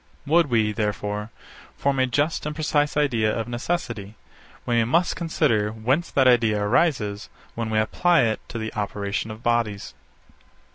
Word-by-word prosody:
Would 160 +1 +3
we, 110 -3 +2
therefore, 105 0 -3 0.5
form 140 -1 0
a 130 - +3
just 145 +5 0
and 150 - -4
precise 150 -1 0
idea 115 -8 +1
of 115 - -3
necessity, 120 - -3 0.5
we 120 -1 +2
must 170 +10 +1
consider 145 -11 +1
whence 125 +10 -1
that 135 -2 +3
idea 115 -4 +4
arises 105 -2 0 0.2
when 115 -1 -3
we 110 - 0
apply 170 +11 +3
it 110 -2 0
to - - -5
the 110 0 -4
operation 105 0 -3
of 110 +1 -9
bodies. 115 -4 -1
115 Hz, 150 wpm, -24 LUFS, 110-145 Hz, 0.5 s, idea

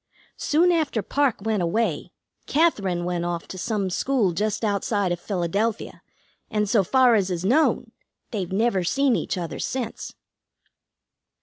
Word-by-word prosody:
Soon 340 +4 +3
after 305 - 0
Parke 275 -1 0
went 215 -2 0
away, 180 -2 -1 0.4
Katherine 200 - +1
went 175 -1 -1
off 175 -1 -3
to 185 - -7
some 200 -2 -1
school 235 -2 +1
just 210 +5 -1
outside 200 -2 0
of 175 - -2
Philadelphia, 200 +4 -2 0.5
and, 210 -1 0
so 205 0 +3
far 255 +4 +4
as 200 -4 +2
is 180 0 -3
known, 285 +10 +2 0.4
they've 195 -6 -3
never 195 -1 +1
seen 270 +7 +2
each - - -2
other 170 -3 -5
since." 250 -4 -4
205 Hz, 140 wpm, -24 LUFS, 180-240 Hz, 0.5 s, far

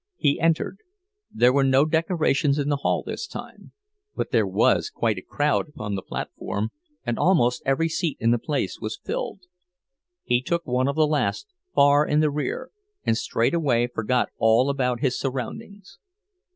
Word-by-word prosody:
He 145 -3 +1
entered. 165 +3 0 0.5
There 125 +1 +4
were 140 0 +3
no 135 +2 +4
decorations 155 -3 +1
in 145 0 -1
the 145 - +1
hall 140 - 0
this - - -5
time; - - -10 0.4
but - - -3
there 110 -5 +3
was 95 +1 +2
quite 110 -5 -1
a - - -11
crowd 145 - 0
upon 110 -8 -5
the 95 - -2
platform, 105 +3 -4 0.4
and 120 - -2
almost 125 -10 +3
every 135 +5 +2
seat 165 -1 -2
in 115 - +2
the 120 - +2
place 140 -7 -2
was 110 0 -4
filled. - - -4 0.8
He 120 0 +1
took 170 +5 -2
one 125 +1 +1
of 140 - -1
the 155 - +4
last, 150 - -1 0.3
far 145 +1 +5
in 150 0 +1
the 155 -1 +2
rear, 150 - -3 0.3
and 115 - +2
straightway 120 +2 +1
forgot 120 +1 0
all 115 +5 +4
about 125 -3 -1
his 130 -4 0
surroundings. 190 - -6
140 Hz, 165 wpm, -24 LUFS, 120-155 Hz, 0.8 s, far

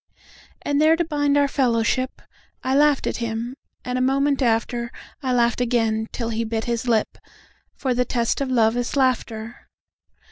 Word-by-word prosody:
And 285 0 +1
there, 315 +1 +5
to 340 +1 0
bind 290 -2 +1
our 285 0 +4
fellowship,I 255 0 -2
laughed 290 -1 +3
at - - -1
him; 235 +1 -3 0.3
and 250 0 -1
a - - 0
moment 275 +2 +2
after,I 235 +2 -2
laughed 240 0 +2
again 225 -2 +1
till 230 -2 -3
he 230 0 -1
bit 225 0 -2
his 235 0 -2
lip, 225 -3 +1 0.6
For 260 -3 -1
the 250 +1 +2
test 235 +1 -1
of 275 - -1
love 230 -3 +3
is 245 +2 -2
laughter. 240 -4 -1
245 Hz, 155 wpm, -23 LUFS, 230-275 Hz, 0.6 s, there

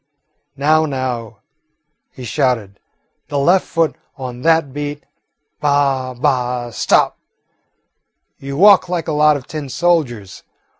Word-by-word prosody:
"Now, 155 +3 +3
now," 130 -5 -4 0.7
he 130 - -11
would - - -6
shout, 125 -5 0 0.6
"the 145 - -3
left 175 +7 +3
foot 165 -2 0 0.2
on 125 -2 -7
that 160 -3 +2
beat. 145 0 -5 0.6
Bah, 140 -3 0
bah, 125 -2 -1
stop! - - +1 1.2
You 140 0 -6
walk 190 0 +6
like 175 -3 -2
a - - -1
lot 150 0 +4
of 130 - -11
tin 155 -4 -6
soldiers. 125 - -1
140 Hz, 120 wpm, -18 LUFS, 125-155 Hz, 1.2 s, walk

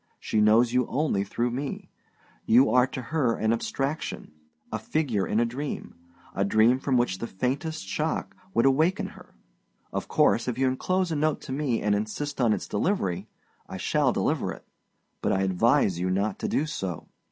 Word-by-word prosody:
She 110 - 0
knows 115 +3 +4
you 125 -1 +2
only 135 -7 0
through 120 +4 -1
me; 135 +3 -5 0.6
you 125 +5 +5
are 125 0 +5
to 130 0 -6
her 130 -3 0
an 110 +1 +1
abstraction, 135 - -3 0.4
a 110 - -2
figure 110 - -1
in 105 - +1
a 120 - +3
dream 135 +5 -5 0.4
a 100 - 0
dream 110 +5 +4
from 135 -1 +1
which 105 -6 0
the 115 - -3
faintest 140 - -3
shock 155 +1 -2 0.2
would 115 - +4
awaken 155 +7 +2
her. - - -16 0.6
Of - - -3
course, 115 - +3
if 125 -2 -2
you 135 0 +2
enclose 180 +7 0
a - - 0
note 155 +1 +1
to - - -8
me 135 -4 -1
and 105 0 +2
insist 120 +8 -2
on 115 -3 +4
its - - -1
delivery, 105 - -1 0.4
I - - -6
shall - - +2
deliver - - 0
it; - - -10 0.6
but - - +1
I 95 - +1
advise 95 0 +2
you 90 +1 0
not 100 +2 0
to - - -2
do 145 - +1
so. 95 - -5
125 Hz, 185 wpm, -26 LUFS, 105-145 Hz, 0.6 s, you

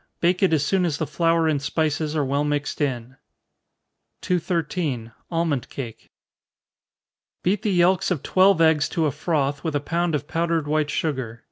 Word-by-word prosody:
Bake 175 +1 +2
it 190 - +4
as 150 -3 +2
soon 190 +3 +2
as 160 -5 0
the 160 - -1
flour 165 0 +1
and 150 -3 +1
spices 155 0 -1
are 150 -2 +1
well 140 +2 0
mixed 145 0 -2
in. 130 -2 -2 1.0
213. 165 -8 -1 0.2
Almond 165 -6 -1
Cake. 115 -5 -8 1.3
Beat 190 +2 +1
the 215 - -1
yelks 180 0 +3
of 175 -7 -2
twelve 190 -1 +4
eggs 160 -2 +4
to 165 - 0
a 150 - +1
froth, 145 -3 -1
with 160 -3 -2
a - - +2
pound 170 +3 -1
of 145 0 -3
powdered 165 -2 0
white 150 0 +1
sugar. 130 -8 -2
155 Hz, 165 wpm, -23 LUFS, 145-170 Hz, 1.3 s, it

